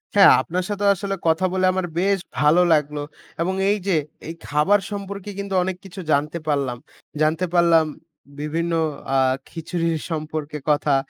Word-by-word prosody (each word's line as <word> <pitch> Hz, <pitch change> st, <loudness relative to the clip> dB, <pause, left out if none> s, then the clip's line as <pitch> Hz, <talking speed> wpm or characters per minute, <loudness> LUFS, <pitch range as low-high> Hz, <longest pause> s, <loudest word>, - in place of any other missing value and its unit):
আচ্ছা, 200 Hz, -, +6 dB, 0.2 s
আপনার 180 Hz, +2 st, -2 dB
সাথেও 205 Hz, 0 st, +1 dB
আসলে 195 Hz, +1 st, -3 dB
কথা 165 Hz, +3 st, +3 dB
বলে 185 Hz, 0 st, +2 dB
আমার 185 Hz, -1 st, -1 dB
বেশ 195 Hz, +1 st, +2 dB, 0.2 s
ভালো 150 Hz, +6 st, +5 dB
লাগলো 150 Hz, -1 st, 0 dB, 0.4 s
এবং 180 Hz, +3 st, 0 dB, 0.2 s
এই 205 Hz, -, +2 dB
যে 185 Hz, -, +3 dB, 0.3 s
এই 165 Hz, -, -4 dB
খাবার 150 Hz, +8 st, +3 dB
সম্পর্কে 200 Hz, 0 st, -6 dB
কিন্তু 200 Hz, -1 st, -4 dB
অনেক 185 Hz, 0 st, -2 dB
কিছু 190 Hz, +1 st, -10 dB
জানতে 150 Hz, +4 st, +1 dB
পারলাম। 140 Hz, -4 st, 0 dB, 0.4 s
জানতে 160 Hz, +4 st, +2 dB
পারলাম 170 Hz, -2 st, +5 dB, 0.5 s
বিভিন্ন 165 Hz, +3 st, -2 dB, 0.4 s
আ -, -, +4 dB, 0.3 s
খিচুড়ির 165 Hz, -1 st, -2 dB
সম্পর্কে 155 Hz, -1 st, -4 dB
কথা 145 Hz, -1 st, +3 dB
170 Hz, 150 wpm, -22 LUFS, 150-190 Hz, 0.5 s, আচ্ছা